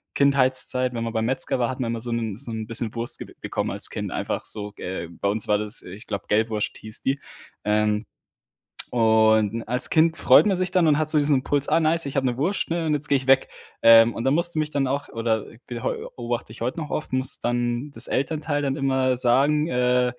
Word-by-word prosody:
Kindheitszeit, 130 Hz, -2 st, +3 dB
wenn 115 Hz, -, -3 dB
man 115 Hz, -1 st, -4 dB
beim 110 Hz, -1 st, -1 dB
Metzger 130 Hz, +1 st, -1 dB
war, 120 Hz, -, 0 dB
hat 130 Hz, -, -6 dB
man 115 Hz, -2 st, -2 dB
immer 115 Hz, -, -4 dB
so 120 Hz, +1 st, -3 dB
'n 110 Hz, -3 st, -3 dB
so 125 Hz, -2 st, -2 dB
'n 110 Hz, -1 st, -5 dB
bisschen 115 Hz, -1 st, 0 dB
Wurst 115 Hz, 0 st, -1 dB
ge -, -, -10 dB
bekommen -, -, -3 dB
als -, -, +1 dB
Kind. -, -, -5 dB
Einfach -, -, -4 dB
so, 105 Hz, -1 st, -2 dB
äh, 90 Hz, -2 st, -5 dB
bei 85 Hz, +3 st, -4 dB
uns 105 Hz, +1 st, 0 dB
war 105 Hz, 0 st, +2 dB
das, 105 Hz, +2 st, +1 dB
äh 90 Hz, -, -11 dB
ich 100 Hz, +3 st, -12 dB
glaube, 100 Hz, -, -5 dB
Gelbwurst 110 Hz, 0 st, -1 dB
hieß 110 Hz, 0 st, 0 dB
die. 135 Hz, +1 st, -1 dB, 0.4 s
Ähm, 105 Hz, +1 st, 0 dB, 0.9 s
und 110 Hz, -1 st, +2 dB
als 125 Hz, +3 st, +2 dB
Kind 160 Hz, 0 st, +3 dB
freut -, -, +5 dB
man 200 Hz, -3 st, +2 dB
sich 185 Hz, 0 st, -1 dB
dann 175 Hz, -3 st, +3 dB
und 145 Hz, -, +3 dB
hat 155 Hz, 0 st, 0 dB
so 155 Hz, -, +4 dB
diesen 145 Hz, -1 st, +3 dB
Impuls: 145 Hz, +2 st, +1 dB
„Ah, 165 Hz, -, +2 dB
nice, 160 Hz, 0 st, +2 dB
ich 140 Hz, -, -6 dB
habe 135 Hz, -1 st, 0 dB
'ne 120 Hz, 0 st, -2 dB
Wurst 180 Hz, +9 st, -1 dB
ne, 165 Hz, 0 st, -2 dB
und 155 Hz, -, 0 dB
jetzt 145 Hz, 0 st, 0 dB
gehe 140 Hz, -, +4 dB
ich 130 Hz, -, -7 dB
weg." 135 Hz, 0 st, +4 dB, 0.3 s
Ähm, 115 Hz, 0 st, +7 dB
und 115 Hz, -, -4 dB
da 135 Hz, -, +1 dB
musste 170 Hz, +1 st, +1 dB
mich 155 Hz, 0 st, -2 dB
dann 140 Hz, -2 st, 0 dB
auch 140 Hz, +2 st, -3 dB
oder 115 Hz, -1 st, -2 dB, 0.2 s
be 120 Hz, -2 st, -7 dB
heu -, -, -1 dB, 0.2 s
beobachte 120 Hz, -2 st, -5 dB
ich 115 Hz, -, -15 dB
heute 125 Hz, +6 st, -3 dB
noch 150 Hz, -, -6 dB
oft, 155 Hz, -, -4 dB
muss 130 Hz, 0 st, 0 dB
dann 120 Hz, +3 st, -2 dB
das -, -, +1 dB
Elternteil 145 Hz, +2 st, -2 dB
dann 135 Hz, -1 st, -2 dB
immer 130 Hz, -2 st, 0 dB
sagen, 140 Hz, +5 st, +2 dB
äh: 125 Hz, -1 st, +1 dB
125 Hz, 240 wpm, -23 LUFS, 115-145 Hz, 0.9 s, Ähm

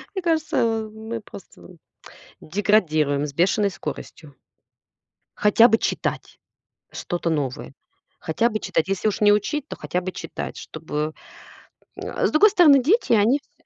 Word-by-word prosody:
Мне 380 Hz, -, -2 dB
кажется, 320 Hz, -3 st, 0 dB
а, 225 Hz, -1 st, -1 dB
мы 220 Hz, +1 st, -7 dB
просто 200 Hz, -, -14 dB, 0.7 s
деградируем 155 Hz, -7 st, +1 dB
с 145 Hz, -, -7 dB
бешеной 195 Hz, +6 st, +2 dB
скоростью. 150 Hz, -3 st, -8 dB, 1.0 s
Хотя 220 Hz, +3 st, +5 dB
бы 225 Hz, -, +3 dB
читать -, -, -3 dB, 0.5 s
что-то 175 Hz, -1 st, -3 dB
новое, 145 Hz, -5 st, -3 dB, 0.5 s
хотя 225 Hz, +9 st, 0 dB
бы 215 Hz, -1 st, -3 dB
читать. 185 Hz, -3 st, -1 dB
Если 195 Hz, +2 st, -1 dB
уж 215 Hz, +1 st, -2 dB
не 205 Hz, 0 st, +6 dB
учить, 285 Hz, +8 st, 0 dB
то -, -, -7 dB
хотя 180 Hz, -, -3 dB
бы 185 Hz, +1 st, -5 dB
читать, -, -, -7 dB
чтобы 155 Hz, -1 st, -5 dB, 0.8 s
Э, -, -, -2 dB
с -, -, -3 dB
другой 410 Hz, +8 st, +6 dB
стороны, 310 Hz, -9 st, +6 dB
дети, 320 Hz, -, +2 dB
они 225 Hz, +6 st, +3 dB
всё -, -, -39 dB
210 Hz, 145 wpm, -22 LUFS, 165-235 Hz, 1.0 s, не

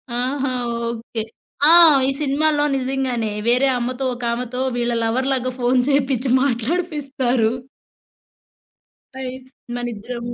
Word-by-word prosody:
ఆహా! 260 Hz, +2 st, -1 dB, 0.4 s
ఓకే. 230 Hz, -1 st, -4 dB, 0.5 s
ఆ! -, -, +8 dB, 0.4 s
ఈ -, -, +2 dB
సినిమాలో 295 Hz, +1 st, +2 dB
నిజంగానే 255 Hz, -4 st, -2 dB, 0.2 s
వేరే 250 Hz, +3 st, +4 dB
అమ్మతో 250 Hz, +2 st, -3 dB
ఒకామెతో 245 Hz, +1 st, -3 dB
వీళ్ళ 240 Hz, 0 st, -1 dB
లవర్‌లాగా 255 Hz, +2 st, 0 dB
ఫోను 250 Hz, +1 st, +2 dB
చేపిచ్చి 270 Hz, -2 st, +1 dB
మాట్లాడిపిస్తారు. 270 Hz, -3 st, -1 dB, 1.7 s
అయ్ 255 Hz, -1 st, -5 dB, 0.4 s
మనిద్దరము 240 Hz, 0 st, -5 dB
255 Hz, 95 wpm, -20 LUFS, 240-270 Hz, 1.7 s, ఆ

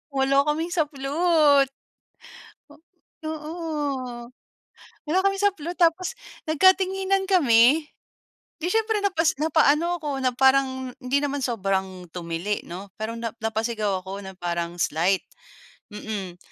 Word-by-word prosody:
wala 275 Hz, +1 st, +3 dB
kaming 325 Hz, +3 st, -1 dB
saplot. 295 Hz, -2 st, +3 dB, 1.6 s
O 310 Hz, -, -3 dB
oo, 295 Hz, -6 st, -4 dB, 0.8 s
wala 360 Hz, +5 st, +2 dB
kami 390 Hz, 0 st, +2 dB
saplot 360 Hz, -4 st, 0 dB
tapos, 350 Hz, +6 st, +2 dB, 0.3 s
nagkatinginan 380 Hz, +3 st, +3 dB
kami. 295 Hz, -, +5 dB, 0.7 s
'Di 340 Hz, -, -2 dB
siyempre 445 Hz, -1 st, +1 dB
napas 330 Hz, -5 st, +2 dB
napaano 315 Hz, +2 st, +3 dB
ako 300 Hz, -, -3 dB
na 255 Hz, -, +2 dB
parang 265 Hz, -1 st, +2 dB
hindi 270 Hz, +3 st, +1 dB
naman 285 Hz, 0 st, -1 dB
sobrang 190 Hz, -6 st, -2 dB
tumili 175 Hz, +4 st, -3 dB
'no, 190 Hz, +3 st, -8 dB
pero 225 Hz, +1 st, -3 dB
na 230 Hz, -2 st, -3 dB
napasigaw 220 Hz, -3 st, -1 dB
ako, 195 Hz, +1 st, -6 dB
na 190 Hz, -, -8 dB
parang 170 Hz, -1 st, -3 dB
slight. 180 Hz, +5 st, +1 dB, 0.7 s
Mm, 200 Hz, -4 st, -6 dB
275 Hz, 115 wpm, -24 LUFS, 215-330 Hz, 1.6 s, kami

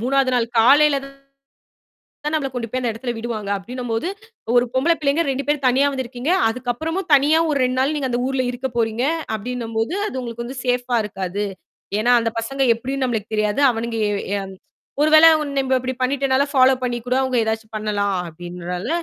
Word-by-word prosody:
மூன்றாவது 270 Hz, -1 st, +2 dB
நாள் 240 Hz, -2 st, +2 dB
காலையில 285 Hz, +5 st, +6 dB, 1.3 s
தான் 300 Hz, +1 st, -1 dB
நம்மள 295 Hz, -3 st, 0 dB
கொண்டு 240 Hz, -2 st, -4 dB
போய் 255 Hz, -, -2 dB
அந்த 245 Hz, -2 st, 0 dB
இடத்தில 240 Hz, +2 st, -4 dB
விடுவாங்க 225 Hz, -3 st, -4 dB
அப்பிடின்னம்போது, 235 Hz, -, -3 dB, 0.5 s
ஒரு 245 Hz, -, +5 dB
பொம்பள 285 Hz, +6 st, +3 dB
பிள்ளைங்க 295 Hz, +2 st, +1 dB
2 270 Hz, 0 st, -2 dB
பேரும் 290 Hz, -2 st, 0 dB
தனியாக 275 Hz, +3 st, +2 dB
வந்திருக்கிறீங்க. 260 Hz, +4 st, -2 dB, 0.2 s
அதுக்கு 245 Hz, +2 st, -3 dB
அப்புறமும் 325 Hz, +8 st, -4 dB
தனியாக 315 Hz, +4 st, +4 dB
ஒரு 290 Hz, -, +1 dB
2 255 Hz, 0 st, 0 dB
நாள் 275 Hz, +4 st, +1 dB
நீங்க 270 Hz, -3 st, -2 dB
அந்த 240 Hz, 0 st, 0 dB
ஊர்ல 265 Hz, -1 st, 0 dB
இருக்கப் 245 Hz, 0 st, -5 dB
போறீங்க! 225 Hz, +2 st, 0 dB, 0.3 s
அப்பிடின்னம்போது, 225 Hz, -, -3 dB
அது 260 Hz, -, -4 dB
உங்களுக்கு 235 Hz, -1 st, -6 dB
வந்து 255 Hz, +2 st, -7 dB
சேஃப்பா 245 Hz, -1 st, +1 dB
இருக்காது. 195 Hz, 0 st, -3 dB, 0.5 s
ஏன்னா, 240 Hz, +3 st, +3 dB
அந்த 230 Hz, -, -1 dB
பசங்க 270 Hz, +4 st, -2 dB
எப்பிடின்னு 260 Hz, +3 st, -3 dB
நமமளுக்கு 220 Hz, -3 st, -3 dB
தெரியாது. 215 Hz, +4 st, 0 dB
அவனுங்க 230 Hz, 0 st, -3 dB
அ -, -, -1 dB, 0.2 s
எ -, -, -1 dB, 0.6 s
ஒருவேள, 310 Hz, +1 st, +7 dB, 0.3 s
நம்ம 265 Hz, -1 st, +2 dB
இப்பிடி 255 Hz, 0 st, -4 dB
பண்ணிட்டனால, 270 Hz, +1 st, +2 dB
பாலோப் 260 Hz, 0 st, +4 dB
பண்ணி 240 Hz, -1 st, -1 dB
கூட 250 Hz, -, +2 dB
அவுங்க 260 Hz, -1 st, -1 dB
ஏதாசச்சும் 220 Hz, 0 st, -3 dB
பண்ணலாம் 205 Hz, -2 st, -1 dB
அப்பிடின்றால, 175 Hz, +2 st, -6 dB
250 Hz, 175 wpm, -21 LUFS, 225-270 Hz, 1.3 s, ஒருவேள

